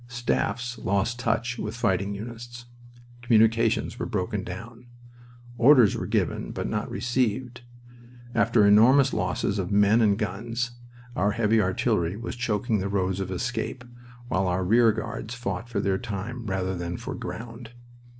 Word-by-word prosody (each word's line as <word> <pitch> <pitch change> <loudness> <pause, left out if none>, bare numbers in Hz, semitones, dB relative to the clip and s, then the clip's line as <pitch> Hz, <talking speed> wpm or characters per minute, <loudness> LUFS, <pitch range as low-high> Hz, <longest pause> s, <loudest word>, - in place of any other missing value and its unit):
Staffs 125 0 -2
lost 100 +5 0
touch 120 +1 -1
with 105 +2 -4
fighting 100 -3 0
units. 120 +3 -8 0.6
Communications 115 -1 +2
were - - -2
broken - - -2
down. 115 +1 -9 0.7
Orders 125 -4 +6
were - - -4
given - - -1
but - - -4
not - - -2
received. 120 0 -1 0.7
After 115 -2 +3
enormous 125 +7 +6
losses 100 +1 -1
of 90 0 -3
men 105 +3 +4
and 105 -2 +3
guns, 115 +3 -3 0.4
our 100 +2 +1
heavy 110 0 +2
artillery 95 -1 0
was 115 - -5
choking 110 -2 0
the 95 +1 -2
roads 95 -1 0
of 95 -1 -3
escape, 120 +5 -3 0.4
while 95 -6 0
our 90 +1 0
rear 115 +3 +5
guards 115 +1 -5
fought 120 -1 -4
for 100 -5 0
time 110 +4 -5
rather 95 -1 -1
than 85 0 -4
for - - -6
ground. 115 0 -7
115 Hz, 140 wpm, -26 LUFS, 100-120 Hz, 0.7 s, Orders